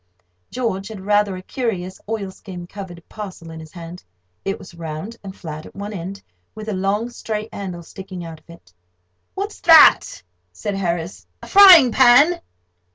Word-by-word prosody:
George 225 Hz, -6 st, -3 dB
had 215 Hz, -3 st, -8 dB
rather 205 Hz, 0 st, +1 dB
a 185 Hz, -, -9 dB
curious 190 Hz, -7 st, -4 dB
oilskin 190 Hz, -4 st, -6 dB
covered 175 Hz, -3 st, -10 dB
parcel 190 Hz, -6 st, -9 dB
in 160 Hz, -, -9 dB
his 160 Hz, -1 st, -12 dB
hand. 170 Hz, 0 st, -10 dB, 0.4 s
It 195 Hz, -, -2 dB
was 185 Hz, -, -13 dB
round 165 Hz, +6 st, -7 dB
and 195 Hz, -1 st, -8 dB
flat 155 Hz, -2 st, -8 dB
at -, -, -17 dB
one 205 Hz, +2 st, -6 dB
end, 190 Hz, +1 st, -7 dB, 0.3 s
with 215 Hz, 0 st, -8 dB
a -, -, -2 dB
long 200 Hz, +5 st, -1 dB
straight 215 Hz, -2 st, -5 dB
handle 180 Hz, -4 st, -6 dB
sticking 185 Hz, 0 st, -9 dB
out 165 Hz, -1 st, -9 dB
of 155 Hz, -, -36 dB
it. 170 Hz, -, -16 dB, 0.6 s
"What's -, -, -5 dB
that?" -, -, +6 dB, 0.3 s
said 90 Hz, -, -5 dB
Harris—"a 175 Hz, -2 st, -5 dB
frying 365 Hz, -10 st, +8 dB
pan?" 270 Hz, +8 st, +5 dB
195 Hz, 160 wpm, -20 LUFS, 170-215 Hz, 0.6 s, frying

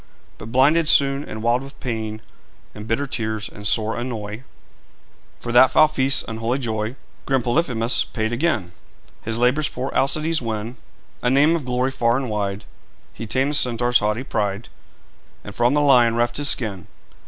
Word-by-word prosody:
But 110 Hz, -, -9 dB
blinded 150 Hz, +6 st, +3 dB
soon, 140 Hz, -1 st, +4 dB
and 110 Hz, 0 st, -7 dB
wild 120 Hz, +2 st, +2 dB
with 135 Hz, 0 st, -12 dB
pain 110 Hz, -3 st, -4 dB, 0.5 s
In 105 Hz, 0 st, -9 dB
bitter 115 Hz, +6 st, -1 dB
tears 110 Hz, -5 st, -3 dB
and 105 Hz, 0 st, -6 dB
sore 110 Hz, +1 st, +1 dB
annoy 115 Hz, -3 st, -5 dB, 1.0 s
For 120 Hz, -, -5 dB
that 125 Hz, +2 st, +6 dB
foul 155 Hz, +3 st, +5 dB
feast's 135 Hz, -2 st, +1 dB
unholy 115 Hz, +3 st, -2 dB
joy 110 Hz, -2 st, -3 dB, 0.3 s
Grim 135 Hz, -3 st, +1 dB
Polyphemus 120 Hz, -3 st, 0 dB
paid 110 Hz, 0 st, -3 dB
again. 120 Hz, -, -1 dB, 0.5 s
His 115 Hz, 0 st, -3 dB
labours 125 Hz, +6 st, +2 dB
for 130 Hz, +2 st, -2 dB
Alcides 155 Hz, +3 st, +1 dB
win 115 Hz, +1 st, -4 dB, 0.4 s
A 125 Hz, -, +1 dB
name 145 Hz, +5 st, +4 dB
of 155 Hz, -6 st, -4 dB
glory 125 Hz, +1 st, 0 dB
far 120 Hz, -2 st, +1 dB
and 130 Hz, -4 st, -3 dB
wide; 100 Hz, 0 st, -3 dB, 0.5 s
He 115 Hz, -, -7 dB
tamed 135 Hz, +5 st, 0 dB
the -, -, -3 dB
Centaur's 125 Hz, -3 st, +2 dB
haughty 105 Hz, +4 st, -1 dB
pride, 105 Hz, -4 st, -3 dB, 0.7 s
And 105 Hz, -, -9 dB
from 120 Hz, +5 st, +2 dB
the 150 Hz, -, +3 dB
lion 125 Hz, -5 st, +4 dB
reft 120 Hz, 0 st, 0 dB
his 145 Hz, -1 st, +1 dB
skin. 100 Hz, -7 st, -2 dB
120 Hz, 165 wpm, -21 LUFS, 110-135 Hz, 1.0 s, that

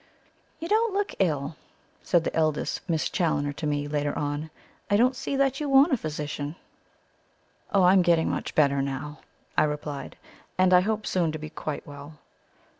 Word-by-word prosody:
"You 330 Hz, -, -6 dB
don't 435 Hz, 0 st, +2 dB
look 405 Hz, 0 st, -1 dB
ill," 150 Hz, -5 st, 0 dB, 0.4 s
said 175 Hz, -2 st, +2 dB
the -, -, -3 dB
eldest 155 Hz, -2 st, 0 dB
Miss 160 Hz, -2 st, +1 dB
Challoner 145 Hz, -5 st, 0 dB
to 150 Hz, -, -4 dB
me, 145 Hz, 0 st, -1 dB
later 145 Hz, 0 st, -1 dB
on. 145 Hz, +2 st, -3 dB, 0.4 s
"I 205 Hz, -, +4 dB
don't 250 Hz, +4 st, +3 dB
see 275 Hz, -, -3 dB
that 270 Hz, -1 st, +1 dB
you 295 Hz, -2 st, -2 dB
want 275 Hz, +4 st, +6 dB
a -, -, +5 dB
physician." 150 Hz, -3 st, -4 dB, 1.2 s
"Oh, 195 Hz, -2 st, +4 dB
I 180 Hz, +1 st, +6 dB
am 190 Hz, -, +6 dB
getting 170 Hz, -2 st, +3 dB
much -, -, -3 dB
better 140 Hz, -2 st, +3 dB
now," 140 Hz, +2 st, -4 dB, 0.4 s
I -, -, +4 dB
replied; 150 Hz, -2 st, -4 dB, 0.4 s
"and 185 Hz, 0 st, +4 dB
I 180 Hz, -, +7 dB
hope 215 Hz, +2 st, -1 dB
soon 170 Hz, -4 st, +1 dB
to -, -, -3 dB
be 155 Hz, 0 st, -8 dB
quite 155 Hz, -, -5 dB
well." 145 Hz, +1 st, -10 dB
155 Hz, 180 wpm, -26 LUFS, 145-200 Hz, 1.2 s, I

